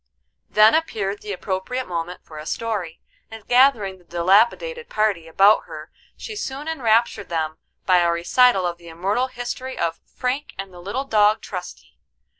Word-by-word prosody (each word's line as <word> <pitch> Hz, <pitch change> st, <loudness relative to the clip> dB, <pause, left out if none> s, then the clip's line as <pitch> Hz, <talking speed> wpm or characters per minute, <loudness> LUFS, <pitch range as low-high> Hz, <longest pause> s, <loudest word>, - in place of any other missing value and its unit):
Then 215 Hz, +1 st, +6 dB
appeared 210 Hz, -11 st, -1 dB
the 210 Hz, -, -6 dB
appropriate 195 Hz, +7 st, -3 dB
moment 175 Hz, 0 st, -4 dB
for 155 Hz, -1 st, -10 dB
a 155 Hz, -, -9 dB
story, 210 Hz, -8 st, -3 dB, 0.3 s
and 225 Hz, -2 st, -11 dB
gathering 245 Hz, -7 st, +3 dB
the -, -, -22 dB
dilapidated 225 Hz, -, +2 dB
party 210 Hz, -6 st, 0 dB
about 195 Hz, +6 st, +4 dB
her -, -, -10 dB, 0.3 s
she 440 Hz, -, -7 dB
soon 285 Hz, -6 st, -5 dB
enraptured 235 Hz, -, +1 dB
them 160 Hz, -2 st, -2 dB, 0.3 s
by 185 Hz, -1 st, +5 dB
a 170 Hz, -1 st, +3 dB
recital 190 Hz, +4 st, +3 dB
of 175 Hz, -1 st, -3 dB
the 170 Hz, -1 st, -12 dB
immortal 195 Hz, +10 st, -1 dB
history 255 Hz, +1 st, -6 dB
of 165 Hz, -1 st, -2 dB
"Frank 260 Hz, +4 st, -3 dB
and 195 Hz, -1 st, -7 dB
the 175 Hz, -, -12 dB
little 235 Hz, +9 st, -3 dB
dog 215 Hz, -3 st, +3 dB
Trusty." 180 Hz, -3 st, -8 dB
205 Hz, 160 wpm, -22 LUFS, 175-250 Hz, 0.3 s, Then